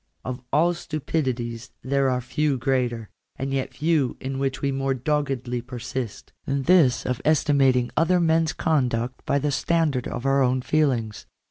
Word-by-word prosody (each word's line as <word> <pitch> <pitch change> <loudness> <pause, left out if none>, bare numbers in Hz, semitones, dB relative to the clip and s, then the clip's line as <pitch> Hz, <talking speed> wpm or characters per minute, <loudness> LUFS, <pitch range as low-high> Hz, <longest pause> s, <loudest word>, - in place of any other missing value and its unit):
Of 125 0 -4
all 165 +5 +3
stupidities 130 -8 -3
there 135 0 +1
are 125 0 0
few 145 +3 0
greater, 120 -4 -1 0.2
and 135 0 -3
yet 135 -1 -2
few 150 -4 +1
in 135 +1 -4
which 135 -1 -1
we 140 - 0
more 135 0 -1
doggedly 130 -3 -1
persist, 125 -2 -6
than 140 0 -1
this 165 -6 +4
of 125 0 -2
estimating 135 -5 +3
other 180 +3 +3
men's 165 -1 +2
con 150 -6 +1
.duct 120 +2 -3
by 140 - +2
the 145 +1 0
standard 150 -3 0
of 120 - -5
our 135 0 +3
own 130 0 +1
feelings. 125 -9 0
135 Hz, 160 wpm, -24 LUFS, 125-150 Hz, 0.2 s, this